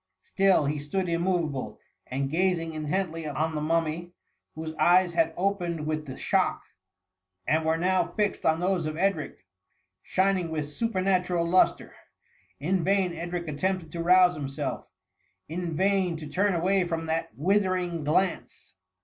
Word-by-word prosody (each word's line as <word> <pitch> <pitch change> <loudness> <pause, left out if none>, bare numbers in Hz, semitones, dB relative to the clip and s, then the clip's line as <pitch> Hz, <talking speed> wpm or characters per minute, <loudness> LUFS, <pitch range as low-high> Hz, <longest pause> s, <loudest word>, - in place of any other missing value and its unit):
Still, 195 -6 +3
he 145 +1 -1
stood 180 +6 -2
immoveable, 170 -5 -1 0.3
and 135 +1 -2
gazing 165 -1 0
intently 160 +1 -2
on 155 +2 -1
the 150 - -2
mummy, 165 +2 -1 0.4
whose 160 0 -5
eyes 180 0 +4
had 165 -1 +2
opened 175 -4 -1
with 155 -1 -3
the 130 - -7
shock, - - 0 0.8
and 160 +1 +2
were 160 +1 +1
now 185 +1 +1
fixed 210 -1 0
on 160 0 +2
those 180 -2 0
of 155 0 -4
Edric, 170 - -1 0.6
shining 190 -2 +1
with 155 -2 -2
supernatiural 185 -1 0
lustre* 185 +2 +2 0.7
In 175 +5 0
vain 190 -1 +2
Edric 170 +1 -4
attempted 165 +2 -2
to 170 - -4
rouse 180 +1 +5
himself; 140 -3 -4 0.3
— - - -45
in 170 0 -4
vain 190 -1 +1
to 155 - -8
turn 185 +6 +1
away 185 +3 +2
from 165 -2 -3
that 165 +1 -1
withering 180 -1 +1
glance. 170 +5 -1
170 Hz, 145 wpm, -27 LUFS, 155-185 Hz, 0.8 s, rouse